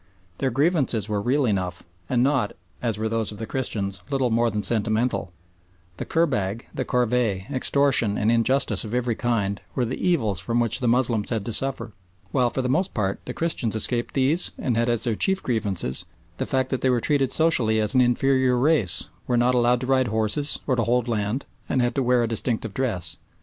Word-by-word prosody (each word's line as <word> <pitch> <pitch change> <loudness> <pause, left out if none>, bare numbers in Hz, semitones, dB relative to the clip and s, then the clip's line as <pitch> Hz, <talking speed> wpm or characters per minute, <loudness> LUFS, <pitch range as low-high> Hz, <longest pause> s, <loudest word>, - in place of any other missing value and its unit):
Their 135 - +1
grievances 135 - +1
were 105 -2 -2
real 130 +5 +1
enough, 95 -5 -2 0.3
and 125 -1 +2
not, 130 -6 +1 0.3
as 115 -4 -1
were 110 +1 -2
those 110 -1 -2
of 105 - -9
the 110 - -5
Christians, 100 -7 -3
little 135 -3 0
more 115 +1 +2
than 105 -1 -3
sentimental; 110 -3 0 0.7
the - - -5
kurbag, 125 - -1
the - - -2
corvée, 120 -5 0
extortion 130 -5 +2
and 110 +2 +1
injustice 120 +4 +2
of 110 +1 -5
every 125 -1 0
kind, 105 -4 -1
were 125 - 0
the 120 - -5
evils 115 - +1
from 115 +6 -1
which 115 +1 +3
the 125 - -1
Moslems 115 -3 +2
had 110 -4 -2
to 115 - -3
suffer, 135 -2 +1 0.4
while 125 -3 +2
for 130 - -3
the - - -1
most 175 +9 0
part 100 -3 -1
the 125 - -5
Christians 150 -10 -2
escaped 120 +2 +1
these 145 +6 +2
and 125 - -1
had 115 +1 +1
as 120 -2 +1
their 115 - 0
chief 190 - +1
grievances 100 - -1 0.3
the - - -2
facts 130 -1 -1
that 130 - -1
they 130 - +2
were 125 -1 +2
treated 135 +1 +1
socially 120 -9 +3
as 105 +2 +3
an 130 - +4
inferior 130 +1 +2
race, 125 - +2 0.2
were 125 - +1
not 120 +1 +3
allowed 120 0 +2
to - - -3
ride 130 -1 +2
horses, 110 +7 +1
or 130 - +1
to 115 - 0
hold 120 +2 0
land, 110 +3 -2 0.2
and 130 - +1
had 120 -1 +1
to 135 - 0
wear 125 -1 +2
a - - 0
distinctive 115 -1 -1
dress. 95 -11 -1
120 Hz, 205 wpm, -24 LUFS, 110-130 Hz, 0.7 s, an